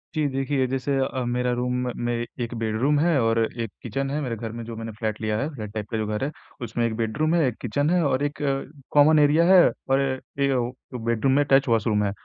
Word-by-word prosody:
जी, 150 -2 +1
देखिए 135 0 0
जैसे 135 +2 -1
अ, 130 -1 -1
मेरा 125 0 0
रूम 125 +1 -1 0.3
में 120 - 0 0.3
एक 115 - -5
बेड़रूम 115 +7 +1
है 160 -3 +3
और 115 0 +2 0.2
एक 115 -3 -4
किचन 135 +4 -2
है 145 +2 -1
मेरे 120 -4 -2
घर 115 0 -6
में 115 0 -6
जो 115 -1 -7
मैंने 115 0 -6
फ़्लैट 110 0 -4
लिया 105 -1 0
है, 140 - -1
फ़्लैट 105 -5 -7
टाइप 105 -2 -5
का 115 - -2
जो 110 -1 -2
घर 105 +4 -2
है, 145 - -1 0.3
उसमें 115 0 -1
1 110 -1 -1
बेडरूम 150 +9 0
है, 165 - +3
1 120 - -2
किचन 145 +6 0
है 180 0 +3
और 140 0 +1
1 145 +1 -3
अ, 135 -1 0 0.3
कॉमन 150 +1 +6
एरिया 150 +3 +4
है 180 - +9 0.3
और 135 +1 +3 0.4
1 140 0 +2
वो 125 -1 0 0.2
जो 125 - -4
बेडरूम 115 +3 +1
में 145 +1 +4
टच 135 0 +5
वॉशरूम 110 -2 +2
है। 100 - 0
125 Hz, 245 wpm, -24 LUFS, 115-140 Hz, 0.4 s, है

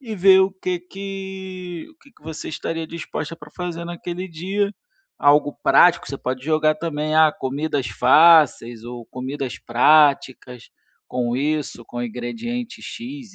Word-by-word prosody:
e 225 -5 -7
ver 190 +1 +6
o 190 - +3
que 185 -2 -4
que 190 -2 -7
o - - -28
que 280 - -20
que - - -27
você 160 -1 -7
estaria 165 +1 -4
disposta 165 -1 -6
para 150 -1 -14
fazer 175 -2 -5
naquele 175 +1 -6
dia, 195 +4 -2 0.4
algo 145 0 +3
prático, 175 -1 +5
você 140 - -5
pode 130 0 -4
jogar 155 0 +2
também: 155 -1 -3
"Ah, 155 -1 +6
comidas 140 0 -3
fáceis 145 -6 +4
ou 120 -1 -8
comidas 130 0 -5
práticas, 130 -1 +2 0.4
com 120 -1 -2
isso, 145 -4 -2
com 120 +2 -6
ingredientes 230 - -5
x, 240 -3 -8
160 Hz, 145 wpm, -21 LUFS, 135-190 Hz, 0.4 s, ver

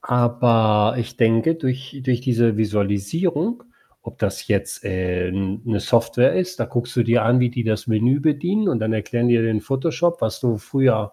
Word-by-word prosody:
aber 115 -3 +2
ich 120 +1 -5
denke, 115 +6 +2
durch 130 -2 -4
durch 125 -2 0
diese 120 -4 +1
Visualisierung, 110 - -1 0.4
ob - - -11
das - - -3
jetzt, - - -1
ähm, 95 +1 -2
'ne 110 -4 -1
Software 120 +3 +2
ist, 185 0 -2
da - - +1
guckst 120 0 -4
du 120 - +4
dir 115 0 +2
an, 125 +2 +3
wie 125 -1 +2
die 120 -1 -3
das 110 -1 -2
Menü 120 +6 +2
bedienen 175 +8 0
und 145 - 0
dann 110 +1 -1
erklären 120 +3 -1
die 120 - +4
dir 115 - +2
den 110 -2 0
Photoshop, 165 +7 -1
was 110 - -2
du 120 -4 0
früher, 110 -4 +1
120 Hz, 185 wpm, -21 LUFS, 110-130 Hz, 0.4 s, du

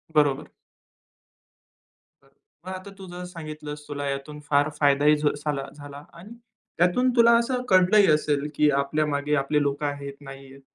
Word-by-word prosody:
बरोबर. 145 -3 +2 1.8
बरं - - -27 0.4
मग 185 - -4
आता 185 +2 -10
तू 190 - -10
जर 180 0 -7
सांगितलंस 155 -4 -8
तुला 145 -1 -4
यातून 140 +2 -6
फार 145 +1 +3
फायदाही 145 +1 +4
झ 150 0 +1
झाला 145 -2 -3
झाला 145 0 -11 0.2
आणि 200 +6 -13 0.5
त्यातून 180 +10 +2
तुला 235 -1 +6
असं 250 +1 -1
कळलंही 190 +2 +5
असेल, 150 -1 +1
की 150 0 +3
आपल्यामागे 150 0 -1
आपले 150 +1 +1
लोकं 145 +1 -1
आहेत, 140 -1 -4
नाही 135 -1 -11
आहेत. 135 +1 -15
150 Hz, 150 wpm, -25 LUFS, 140-175 Hz, 1.8 s, तुला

